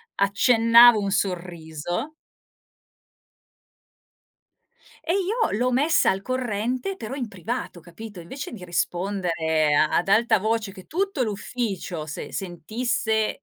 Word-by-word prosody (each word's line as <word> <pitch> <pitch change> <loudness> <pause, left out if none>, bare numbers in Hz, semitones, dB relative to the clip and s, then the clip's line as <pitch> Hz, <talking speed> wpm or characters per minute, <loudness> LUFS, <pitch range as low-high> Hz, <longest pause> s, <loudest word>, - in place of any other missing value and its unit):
accennavo 230 +3 +6
un 200 -1 -2
sorriso. 175 - -3 2.9
E 335 - 0
io 400 - 0
l'ho 250 +3 +1
messa 295 +6 +3
al 190 0 -2
corrente 250 - -2
però 230 - -6
in 255 -4 -4
privato, 200 -1 -5
capito. 185 +4 -10
Invece 265 +12 -7
di 200 -6 -8
rispondere 175 -4 0
ad 155 +5 +2
alta 225 +4 +4
voce 220 0 -1
che 185 -2 -13
tutto 380 -4 -1
l'ufficio 205 -6 -3
se 150 - -7
sentisse, 220 - -2
210 Hz, 105 wpm, -24 LUFS, 180-245 Hz, 2.9 s, accennavo